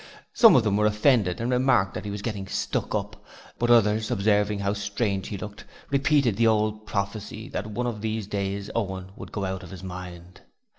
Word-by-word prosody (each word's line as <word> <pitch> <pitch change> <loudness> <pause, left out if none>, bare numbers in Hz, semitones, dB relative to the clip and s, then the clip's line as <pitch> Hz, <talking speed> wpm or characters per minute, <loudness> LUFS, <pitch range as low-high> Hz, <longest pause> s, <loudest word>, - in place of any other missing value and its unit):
Some 225 -2 +7
of 125 - +5
them 105 -2 +1
were 105 0 +3
offended 105 -3 +2
and 120 +2 -1
remarked 125 -7 +3
that - - -6
he - - -3
was 100 0 -5
getting 100 -4 -4
stuck - - -2
up, - - -4 0.4
but 120 - +1
others, 110 -1 +4
observing 105 -2 +2
how 100 0 -1
strange 100 -1 -2
he 100 - -4
looked, 105 +1 -8 0.3
repeated 140 -5 +2
the 115 0 +4
old 110 0 +1
prophecy 105 +3 -4
that 105 -6 -4
one 115 +3 -3
of 115 -4 -3
these 110 -1 -2
days 100 0 -3
Owen 95 -4 -3
would - - -10
go 100 -2 -3
out 95 0 -3
of 90 - -11
his 95 0 -10
mind. 90 -1 -9
105 Hz, 200 wpm, -26 LUFS, 100-115 Hz, 0.4 s, Some